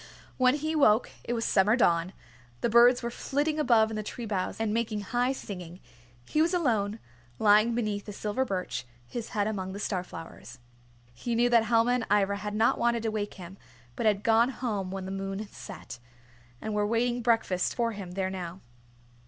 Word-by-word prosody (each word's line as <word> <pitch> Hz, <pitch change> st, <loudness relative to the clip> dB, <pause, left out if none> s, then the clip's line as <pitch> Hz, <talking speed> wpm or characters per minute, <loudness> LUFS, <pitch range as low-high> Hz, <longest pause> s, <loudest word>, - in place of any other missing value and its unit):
When 255 Hz, +1 st, +4 dB
he 310 Hz, +2 st, -2 dB
woke 230 Hz, -6 st, +4 dB
it 240 Hz, -, -2 dB
was 230 Hz, -1 st, -1 dB
summer 210 Hz, +3 st, +4 dB
dawn. 175 Hz, -5 st, +2 dB, 0.5 s
The 235 Hz, -, 0 dB
birds 245 Hz, +2 st, +6 dB
were 235 Hz, -, -2 dB
flitting 295 Hz, +5 st, -1 dB
above 225 Hz, -6 st, +4 dB
in -, -, -4 dB
the 215 Hz, -, -2 dB
tree 230 Hz, +3 st, -6 dB
boughs 200 Hz, -2 st, -2 dB
and 220 Hz, -1 st, 0 dB
making 225 Hz, -2 st, -1 dB
high 245 Hz, +5 st, 0 dB
singing. 180 Hz, -8 st, -7 dB, 0.5 s
He 305 Hz, -, +1 dB
was 340 Hz, +3 st, +2 dB
alone, 220 Hz, -, +1 dB, 0.4 s
lying 215 Hz, +2 st, +4 dB
beneath 210 Hz, -3 st, -2 dB
a -, -, -5 dB
silver 210 Hz, +5 st, -1 dB
birch, 180 Hz, -, -3 dB, 0.2 s
his 230 Hz, -, -6 dB
head 205 Hz, -, +2 dB
among 190 Hz, -3 st, -3 dB
the 200 Hz, -, -6 dB
star 190 Hz, -3 st, -2 dB
flowers. 165 Hz, -2 st, -10 dB, 0.6 s
He 230 Hz, -, -3 dB
knew 240 Hz, +1 st, +3 dB
that 230 Hz, -2 st, +5 dB
Helma 230 Hz, +1 st, +3 dB
and 245 Hz, -2 st, 0 dB
Ivra 200 Hz, -1 st, +2 dB
had 210 Hz, 0 st, -5 dB
not 220 Hz, +2 st, +3 dB
wanted 235 Hz, -1 st, +1 dB
to 225 Hz, -, 0 dB
wake 205 Hz, -1 st, -3 dB
him, 185 Hz, +1 st, -10 dB, 0.4 s
but 220 Hz, -, 0 dB
had 205 Hz, -1 st, +2 dB
gone 230 Hz, +2 st, +4 dB
home 215 Hz, -7 st, -3 dB
when 190 Hz, 0 st, -5 dB
the 190 Hz, -, -5 dB
moon 195 Hz, +2 st, -4 dB
set, 120 Hz, +1 st, -9 dB, 0.6 s
and 220 Hz, -, -4 dB
were 210 Hz, 0 st, +1 dB
waiting 240 Hz, +2 st, 0 dB
breakfast 225 Hz, -6 st, +1 dB
for 235 Hz, -1 st, 0 dB
him 195 Hz, -4 st, -7 dB
there 190 Hz, 0 st, -1 dB
now. 180 Hz, -1 st, -6 dB
215 Hz, 195 wpm, -28 LUFS, 195-235 Hz, 0.6 s, birds